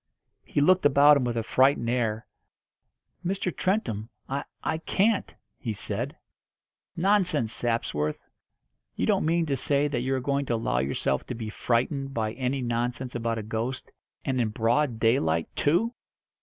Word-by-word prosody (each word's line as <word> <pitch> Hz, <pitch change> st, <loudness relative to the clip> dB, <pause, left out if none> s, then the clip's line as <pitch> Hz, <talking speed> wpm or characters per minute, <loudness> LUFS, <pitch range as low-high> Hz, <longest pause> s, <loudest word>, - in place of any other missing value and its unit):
He 145 Hz, -, -1 dB
looked 185 Hz, +5 st, +4 dB
about 145 Hz, +1 st, +7 dB
him 130 Hz, -, 0 dB
with 120 Hz, -1 st, -1 dB
a 115 Hz, -, 0 dB
frightened 130 Hz, 0 st, +3 dB
air. 115 Hz, -2 st, 0 dB, 1.0 s
"Mr. 185 Hz, -1 st, -2 dB
Trentham, 120 Hz, -, -1 dB, 0.2 s
I 140 Hz, +1 st, -3 dB, 0.2 s
I 160 Hz, -, -1 dB
can't," 200 Hz, +5 st, +1 dB, 0.2 s
he 115 Hz, -5 st, -3 dB
said. 100 Hz, 0 st, -3 dB, 0.8 s
"Nonsense, 175 Hz, -, +2 dB
Sapsworth! 75 Hz, -11 st, -1 dB, 0.8 s
You -, -, 0 dB
don't -, -, +2 dB
mean 170 Hz, +1 st, +2 dB
to 140 Hz, -3 st, 0 dB
say 140 Hz, +2 st, +1 dB
that 120 Hz, -4 st, -1 dB
you 130 Hz, +2 st, 0 dB
are -, -, 0 dB
going 140 Hz, +1 st, -1 dB
to 120 Hz, -, +1 dB
allow 115 Hz, -, 0 dB
yourself 65 Hz, 0 st, -1 dB
to 125 Hz, -, -4 dB
be 115 Hz, -2 st, -5 dB
frightened 135 Hz, +5 st, -1 dB
by 110 Hz, -1 st, -1 dB
any 130 Hz, +1 st, -2 dB
nonsense 120 Hz, +2 st, -2 dB
about 115 Hz, -1 st, -1 dB
a 110 Hz, -, -4 dB
ghost, 115 Hz, +4 st, -4 dB, 0.3 s
and 130 Hz, -2 st, +1 dB
in 115 Hz, -, +1 dB
broad 115 Hz, +3 st, +1 dB
daylight 85 Hz, -9 st, +1 dB
too!" 180 Hz, +11 st, +2 dB
125 Hz, 155 wpm, -27 LUFS, 115-145 Hz, 1.0 s, about